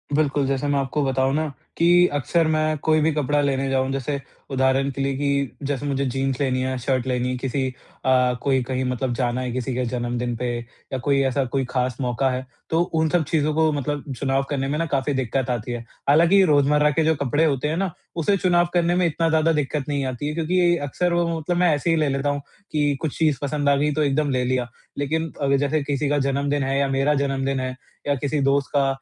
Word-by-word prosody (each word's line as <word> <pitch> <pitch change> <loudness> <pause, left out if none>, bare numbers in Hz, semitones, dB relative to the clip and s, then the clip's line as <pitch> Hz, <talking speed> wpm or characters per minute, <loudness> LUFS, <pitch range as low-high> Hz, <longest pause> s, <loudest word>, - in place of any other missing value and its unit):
बिल्कुल, 145 -2 +1
जैसे 135 +1 -1
मैं 145 -1 +1
आपको 140 +2 -1
बताऊँ 135 0 +1
न 155 0 0 0.3
कि 175 +1 +5
अक्सर 160 +4 +1
मैं 155 0 +1
कोई 155 0 +3
भी 160 +2 +3
कपड़ा 145 0 +1
लेने 135 -1 0
जाऊँ 130 0 +1
जैसे 135 +1 -2 0.3
उदाहरण 130 +1 +2
के 135 - -5
लिए 135 0 0
कि 140 -2 0
जैसे 145 0 -2
मुझे 140 -1 0
जीन्स 135 0 -1
लेनी 130 -2 +1
है, 130 0 -1
शर्ट 130 0 -1
लेनी 125 -1 0
है 125 - -1
किसी 135 +1 -1 0.4
अ, 125 -1 +4
कोई 135 -2 +2
कहीं 130 +1 -2
मतलब 125 0 -2
जाना 120 0 -1
है 125 -1 -3
किसी 130 +1 -3
के 125 0 0
जन्मदिन 120 0 -2
पे 125 +1 -2 0.4
या - - 0
कोई 140 +2 +1
ऐसा 135 +1 +1
कोई 135 +2 -1
खास 125 -2 -1
मौका 125 +1 0
है 130 0 -3 0.2
तो 165 +1 +2 0.2
उन 160 0 +2
सब 175 0 +2
चीज़ों 155 0 0
को 160 0 +3
मतलब 145 -1 -3
चुनाव 135 0 +1
करने 135 -2 -1
में 145 +2 -1
ना 165 - +1
काफ़ी 140 -1 -1
दिक्कत 130 0 -1
आती 120 -1 -2
है। 120 -1 -4 0.3
हालाँकि 170 +7 +6
रोज़मर्रा 150 -1 +4
के 160 +2 +1
जो 160 0 +3
कपड़े 145 +3 +1
होते 145 -2 0
हैं 155 +2 -1
ना 190 -1 -1 0.2
उसे 175 +4 +2
चुनाव 175 -2 +3
करने 175 0 +2
में 180 0 +2
इतना 165 0 +1
ज़्यादा 160 0 +3
दिक्कत 150 -1 -1
नहीं 140 -2 -1
आती 130 +2 -3
है 150 - -2
क्योंकि 175 +2 +2
अक्सर 175 +5 -1
वो 170 0 +2
मतलब 165 +3 -2
मैं 175 -2 +4
ऐसे 145 +4 -2
ही 165 - +4
ले 155 -2 +1
लेता 140 +1 0
हूँ 145 0 -2 0.3
कि 145 -2 +1
कुछ 155 -4 -3
चीज़ 155 -4 +2
पसंद 145 0 0
आ 140 - +5
गई 150 +2 +1
तो 155 +1 +1
एकदम 145 +1 +1
ले 130 -2 +1
लिया। 125 -1 0 0.3
लेकिन 160 +3 -1
अग 140 -1 +3
जैसे 145 +2 +1
किसी 140 0 -1
का 145 - +2
जन्मदिन 140 +1 0
है 135 +1 0
या 140 - +2
मेरा 135 +2 +2
जन्मदिन 135 -1 0
है 130 0 -3 0.3
या 145 - +2
किसी 145 +2 -1
दोस्त 140 0 +2
का 140 -1 +3
140 Hz, 230 wpm, -23 LUFS, 130-155 Hz, 0.4 s, हालाँकि